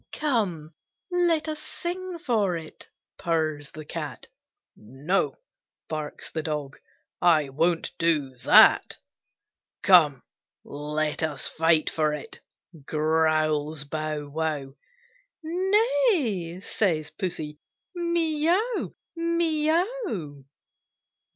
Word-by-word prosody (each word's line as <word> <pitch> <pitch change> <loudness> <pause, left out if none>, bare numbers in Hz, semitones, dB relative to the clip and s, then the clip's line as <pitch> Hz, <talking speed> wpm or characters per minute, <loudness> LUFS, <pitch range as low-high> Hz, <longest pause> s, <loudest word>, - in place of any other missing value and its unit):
"Come, 190 - -1 0.4
let 340 -3 +2
us 310 -1 -3
sing 355 +3 -5
for 215 - 0
it!" 160 -1 -11 0.3
purrs 155 -4 -1
the 155 0 -10
Cat; - - -6 0.5
"No!" 135 - -1 0.5
barks 155 -1 -5
the 160 - -2
Dog, 150 -3 -4 0.4
"I 155 -5 +4
won't 165 +5 0
do 150 -6 +1
that." - - +6 0.9
"Come, 155 -8 +6 0.4
let 150 +1 -2
us 150 -4 -1
fight 160 -1 +3
for 155 -1 +1
it!" 150 - -8 0.4
growls 155 -1 +1
Bow 155 0 -4
wow; 150 -2 -3 0.7
"Nay!" 365 - +1
says 165 -7 0
Pussy, 155 -6 -4 0.3
"mee 335 -3 0
ow, 435 +7 0 0.2
mee 335 -2 +1
ow!" 325 - -1
165 Hz, 95 wpm, -26 LUFS, -, 0.9 s, that